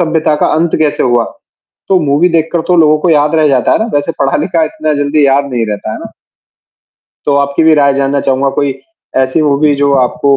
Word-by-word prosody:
सभ्यता 160 -2 0
का - - 0
अंत 165 +1 0
कैसे 150 -2 0
हुआ। 120 -2 +1 0.7
तो 190 -2 +3
मूवी 150 +3 +1
देखकर 165 0 0
तो 180 - +2
लोगों 155 -1 +4
को 175 - 0
याद 150 0 +2
रह 155 -1 +3
जाता 130 -5 +1
है - - +2
ना, 220 - 0
वैसे 145 +3 -1
पढ़ा-लिखा 165 +5 0
इतना 155 0 -3
जल्दी 145 0 +1
याद 140 +1 +2
नहीं 115 -2 -1
रहता 105 +1 -5
है - - -5
ना? - - -10 1.2
तो 145 - +2
आपकी 140 +2 0
भी 160 0 +4
राय 140 -2 +2
जानना 140 +1 0
चाहूँगा 135 0 0
कोई 140 -2 -1 0.4
ऐसी 130 +4 +1
मूवी 145 0 +2
जो 140 0 0
आपको 140 +3 0
145 Hz, 210 wpm, -11 LUFS, 140-160 Hz, 1.2 s, लोगों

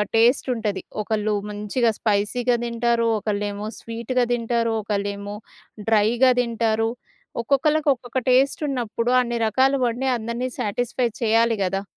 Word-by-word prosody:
Taste 235 +4 +4
ఉంటది. 215 -4 -2 0.2
ఒకళ్ళు 215 0 -1 0.2
మంచిగా 210 +4 0
స్పైసీగా 230 +3 +1
దింటారు, 235 0 +1
ఒకళ్ళేమో 205 0 -3
స్వీట్‌గా 235 +2 -1
దింటారు, 230 -1 0
ఒకళ్ళేమో 200 0 -3 0.5
డ్రైగా 225 +4 +4
దింటారు. 225 -2 0 0.5
ఒక్కొక్కళ్ళకి, 295 +4 +2
ఒక్కొక్క 245 0 -7
టేస్ట్ 265 +4 +3
ఉన్నప్పుడు 240 -2 -1
అన్ని 240 -1 -2
రకాలు 265 +5 +2
వండి 245 +3 -1
అందరిని 235 +3 -3
సాటిస్ఫై 240 +4 -1
చేయాలి 230 0 +3
గదా! 195 +1 -2
230 Hz, 115 wpm, -23 LUFS, 215-245 Hz, 0.5 s, టేస్ట్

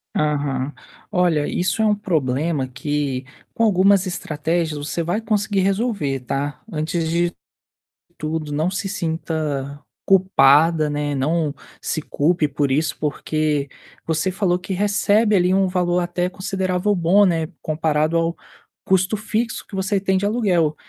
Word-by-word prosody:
Aham. 145 -2 0 0.4
Olha, 175 -6 +2
isso 185 +5 0
é - - +3
um 210 - +4
problema 155 - -1
que, 135 -1 -2 0.3
com 230 - 0
algumas 195 -1 +4
estratégias 160 -1 -2
você 150 +3 -3
vai 175 +7 -1
conseguir 205 -2 0
resolver, 190 - 0
tá. 140 +2 -3
Antes 160 +1 -1
de 170 +1 +1 0.9
tudo 155 -1 -3
não 155 +5 0
se 195 +1 -3
sinta 155 -5 -3 0.3
culpada, 160 -4 +4
né, 145 -1 -2
não 150 +2 0 0.3
se 155 - -2
culpe 155 +2 +1
por 140 0 -1
isso 155 +4 0
porque, 150 -1 -1 0.4
você 160 +3 0
falou 180 -2 +1
que 190 - -5
recebe 205 +2 +2
ali 180 0 +3
um 195 0 +3
valor 180 -1 +1
até 175 +1 -1
considerável 190 +1 -1
bom, 185 +4 +4
né, 165 -3 +1
comparado 155 +1 0
ao 165 +1 0 0.5
custo 190 +3 +2
fixo 225 +2 -2
que 200 - -9
você 195 +1 0
tem 190 -1 +1
de 200 - -1
aluguel. 180 -9 +1
170 Hz, 140 wpm, -21 LUFS, 150-190 Hz, 0.9 s, um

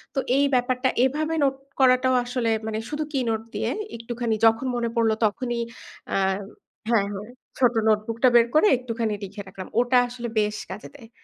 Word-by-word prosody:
তো - - +2 0.2
এই 285 - +4
ব্যাপারটা 255 +1 +2 0.2
এভাবে 310 +4 -1
নোট 270 -1 +2 0.2
করাটাও 255 0 +4
আসলে 245 -1 -1 0.2
মানে 220 0 -2
শুধু 300 +1 -2
কি 275 - 0
নোট 220 -1 0
দিয়ে - - -1 0.3
একটুখানি 230 -1 -2
যখন 225 +3 +3
মনে 235 -1 -1
পড়ল 230 -1 +3
তখনই 240 +3 -1 0.5
আ - - +2 0.7
হ্যাঁ, 225 -4 +3
হ্যাঁ 200 +1 -6 0.3
ছোট 245 -2 +4
নোটবুক 215 +1 +1
টা 255 - +8
বের 235 0 +6
করে 310 +7 +6
একটুখানি 230 -3 -2
লিখে 200 +1 -7
রাখলাম। 190 -1 -8
ওটা 245 +1 +3
আসলে 245 -1 -6
বেশ 210 0 0
কাজে 195 +3 -8
দেয়। 235 -6 -14
240 Hz, 175 wpm, -24 LUFS, 220-255 Hz, 0.7 s, টা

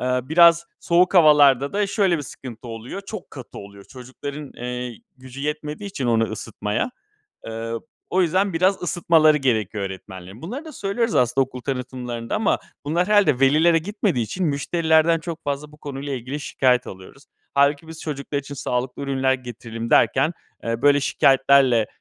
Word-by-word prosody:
eee, 125 0 0
biraz 170 +2 +5 0.2
soğuk 180 +2 +2
havalarda 145 -5 +5
da 205 0 +1
şöyle 195 -3 +1
bir - - -4
sıkıntı 120 -3 -10
oluyor. 115 - -7
Çok 215 -4 -8
katı 130 -4 -10
oluyor. 100 0 -12
Çocukların, 135 +3 -9
eee, 125 -1 -5 0.2
gücü 130 +1 -11
yetmediği 150 +5 -4
için 135 -9 -3
onu 115 -1 +3
ısıtmaya. 105 - -3 0.6
Eee, 115 0 -5 0.4
o 185 - +2
yüzden 185 +2 +1
biraz 185 +4 +2
ısıtmaları 160 -3 +3
gerekiyor 110 -6 -1
öğretmenlerin. 95 +2 -8
Bunları 250 - -6
da 315 - -8
söylüyoruz 230 0 -2
aslında 130 +2 +3
okul 130 -1 -10
tanıtımlarında 125 - -4
ama 215 -1 +1 0.3
bunlar 170 +5 0
herhâlde 200 -11 +4
velilere 155 +5 +4
gitmediği 185 - -1
için 180 - -3
müşterilerden 160 +2 +2
çok 165 0 -7
fazla 145 +1 -4
bu 150 - -17
konuyla 140 -1 -6
ilgili 130 +3 -5
şikâyet 130 -3 +1
alıyoruz. 95 +9 -12 0.3
Hâlbuki 140 +2 +2
biz 160 0 -10
çocuklar 145 -1 -4
için 140 0 -9
sağlıklı 125 0 -3
ürünler 135 -1 +1
getirelim 115 -2 -7
derken, 145 +6 +3 0.3
eee, 115 +1 -2
böyle 145 0 +5
şikâyetlerle, 135 -4 +4
140 Hz, 155 wpm, -22 LUFS, 125-165 Hz, 0.6 s, biraz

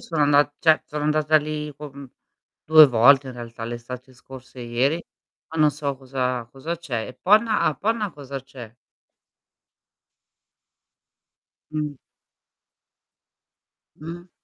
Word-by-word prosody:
sono 160 -3 -1
andat 145 0 +4
cioè 160 -2 +4
sono 150 0 -5
andata 155 +1 +2
lì 150 -1 -3
con 140 -1 -10 0.6
2 155 0 +9
volte 130 +3 +5
in - - -6
realtà, 115 -1 -9
l'estate 120 +2 -8
scorsa 130 +1 -14
e - - -6
ieri, 130 +8 0 0.5
ma 160 - -1
non 150 -1 +5
so 140 -1 -4
cosa 130 -2 -3
cosa 155 +7 -5
c'è. 130 -10 -4
E 130 - -10
Ponna 215 - +3
a - - +2
Ponna 215 - -1
cosa 140 -3 -8
c'è? 125 -4 -12 3.0
Mh. 150 -1 -3 2.0
Mh. 170 +3 -9
145 Hz, 120 wpm, -23 LUFS, 130-155 Hz, 3.0 s, 2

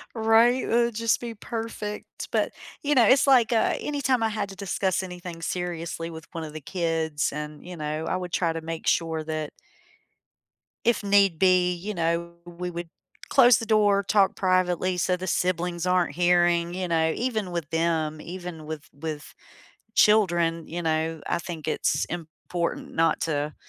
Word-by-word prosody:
Right, 225 +3 +4
it'd 235 -1 +1
just 230 0 +1
be 235 -1 -5
perfect, 220 -1 -6
but, - - +1 0.3
you 295 0 +2
know 240 -3 +6
it's 265 +6 +5
like, 250 -4 +5
uh, 225 - +2
anytime 275 -5 0
I 225 - +2
had 210 -2 -3
to 195 - -9
discuss 190 -1 -1
anything 175 -2 -8
seriously 170 -1 -3
with 160 -1 -10
one 165 - -5
of 155 -1 -8
the 155 - -7
kids, 160 -3 -1
and, 150 0 -7
you 180 -1 -8
know, 155 +1 -3
I - - 0
would 180 -1 -6
try 170 -2 +1
to 165 - -4
make 165 0 -6
sure 160 -1 +1
that 155 -1 -4 1.3
if 235 -2 +2
need 200 -4 +4
be, 180 -1 +4
you 185 +5 -5
know, 170 -1 -1
we 175 +1 -6
would 170 0 -6 0.4
close 245 -4 +7
the 230 - -4
door, 205 -2 +3
talk 200 -1 +3
privately 185 -1 +1
so 180 +1 +1
the 185 - -6
siblings 180 -1 0
aren't 180 -4 +1
hearing, 175 -1 +3
you 185 0 -2
know, 160 -1 +2
even 220 -6 -2
with 170 -3 -4
them, 160 -2 0
even 175 -2 -7
with 155 -1 -6
with 150 +1 -6 0.6
children, 175 -7 +3
you 175 +2 -5
know, 160 0 -1
I - - 0
think 170 -3 -7
it's - - +1
important 170 +1 -4
not 165 -1 +2
to 150 -1 -1
175 Hz, 170 wpm, -26 LUFS, 165-205 Hz, 1.3 s, close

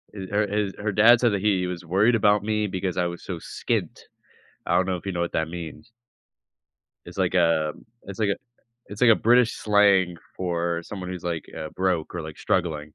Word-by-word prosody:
eh 95 -1 -6
her 105 0 +1
his 105 -1 -1
her 105 0 -2
dad 115 +4 +6
said 120 -3 +3
that 100 - -1
he 95 -4 +1
was 90 -1 -6
worried 100 +8 +3
about 105 -1 +3
me 105 0 0
because 95 -1 -3
I 90 - +1
was 85 0 -7
so 90 -3 -5
skint. - - -3 0.6
I - - +1
don't 90 - +3
know 95 -1 -1
if 85 - -14
you 95 - -2
know 85 - -2
what 85 - -2
that 80 0 0
means 85 +2 -8 1.1
it's - - -11
like - - 0
a 80 -2 +2 0.3
it's 100 +1 -9
like 105 -2 +1
a - - 0 0.5
it's 100 +3 -10
like 120 -2 +6
a - - +8
British 120 +2 +3
slang 100 -4 +3 0.2
for 85 -2 -2
someone 90 -1 -7
who's, 90 -1 -6
like, 85 -2 -3
uh, 80 -1 -5
broke 90 -4 -1
or, 85 - -3
like, 80 -1 -9
struggling. 75 -4 -1
95 Hz, 215 wpm, -24 LUFS, 85-105 Hz, 1.1 s, a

